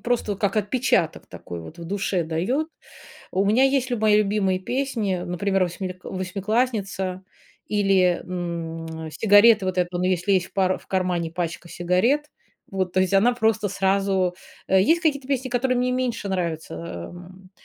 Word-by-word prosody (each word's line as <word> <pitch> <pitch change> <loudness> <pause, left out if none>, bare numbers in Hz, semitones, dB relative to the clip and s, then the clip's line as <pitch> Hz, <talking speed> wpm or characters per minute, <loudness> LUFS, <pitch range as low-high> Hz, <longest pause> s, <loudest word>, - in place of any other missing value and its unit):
просто 240 -3 0
вот 195 - -7
как 200 0 0
отпечаток 210 - +1
такой 85 -1 -8
вот 155 - -11
в 170 - -7
душе 190 -1 -1
даёт. 195 - -1 0.6
У 195 +2 +1
меня 225 +6 +4
есть 270 -1 +2
люба 240 -3 -2
мои 210 0 +6
любимые 200 -3 +1
песни, 235 -3 -1
например, 190 +2 0
восьми 180 +1 -4
восьмиклассница 195 0 -2 0.4
или, 195 -4 +2
м, 165 -3 -5
"Сигареты", 205 +1 +5
вот 185 0 -2
эту, 180 0 0
"Он 180 - -1
если 185 +1 +2
в 180 - -10
пара 185 -1 +1
в - - -20
кармане 180 -3 -1
пачка 170 0 -4
сигарет". 225 - +1 0.4
Вот, 185 -2 -2
то 185 - +1
есть 185 +1 +1
она 225 +6 +4
просто 220 -3 +1
сразу 195 -2 +1 0.3
Э, 190 0 +4
есть 330 - +3
какие-то 280 -5 0
песни, 260 -2 -1
которые 250 +1 +1
мне 250 0 +1
меньше 250 -5 -2
нравятся. 170 -4 -3
Э, 170 0 -6
эм, 185 +1 -13
195 Hz, 165 wpm, -24 LUFS, 180-225 Hz, 0.6 s, мои